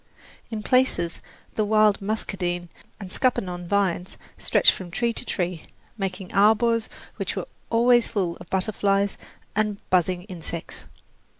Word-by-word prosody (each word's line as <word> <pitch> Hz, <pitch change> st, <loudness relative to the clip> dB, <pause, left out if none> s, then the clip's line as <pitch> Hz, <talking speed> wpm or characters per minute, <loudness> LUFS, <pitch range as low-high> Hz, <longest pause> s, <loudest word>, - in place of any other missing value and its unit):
In 220 Hz, -2 st, -4 dB
places 235 Hz, -11 st, +2 dB, 0.3 s
the 215 Hz, -, +1 dB
wild 215 Hz, -1 st, +4 dB
muscadine 180 Hz, -4 st, -2 dB, 0.3 s
and 190 Hz, -3 st, -8 dB
scuppernong 180 Hz, -9 st, 0 dB
vines 185 Hz, -2 st, 0 dB, 0.2 s
stretched -, -, +4 dB
from 185 Hz, -2 st, -7 dB
tree 235 Hz, +6 st, 0 dB
to -, -, -4 dB
tree, 175 Hz, -3 st, -3 dB, 0.3 s
making 190 Hz, -3 st, -4 dB
arbours 220 Hz, +2 st, +4 dB, 0.3 s
which -, -, -3 dB
were -, -, -3 dB, 0.2 s
always 240 Hz, +1 st, +5 dB
full 185 Hz, -6 st, -1 dB
of -, -, -13 dB
butterflies 200 Hz, 0 st, +1 dB, 0.4 s
and 210 Hz, -1 st, +1 dB
buzzing 180 Hz, 0 st, +2 dB
insects. 170 Hz, -3 st, -7 dB
195 Hz, 125 wpm, -25 LUFS, 180-215 Hz, 0.4 s, always